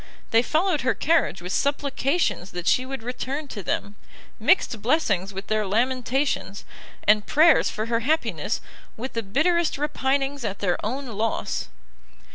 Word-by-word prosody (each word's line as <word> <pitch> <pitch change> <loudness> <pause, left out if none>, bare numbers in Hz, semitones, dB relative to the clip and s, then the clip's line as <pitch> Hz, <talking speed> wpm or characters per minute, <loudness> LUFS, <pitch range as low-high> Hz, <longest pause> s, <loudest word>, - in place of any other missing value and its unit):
They 225 - +5
followed 315 +4 +1
her 255 +1 +1
carriage 315 - +1
with 180 - -5
supplications 280 - 0
that 175 -1 -5
she 255 +1 +2
would 270 -3 -5
return 260 +4 -4
to 210 - -6
them, 200 +2 -3 0.4
mixing 235 - +2
blessings 210 - +1
with 195 0 -6
their 215 0 0
lamentations, 250 0 0 0.4
and 210 0 +4
prayers 315 0 +5
for 215 - -3
her 230 0 0
happiness 305 +7 -1 0.4
with 255 +4 -5
the 230 - -1
bitterest 310 - +1
repinings 275 -1 -1
at 200 -3 -3
their 180 -3 -1
own 260 +6 -3
loss! 225 -2 -2
250 Hz, 145 wpm, -24 LUFS, 210-285 Hz, 0.4 s, They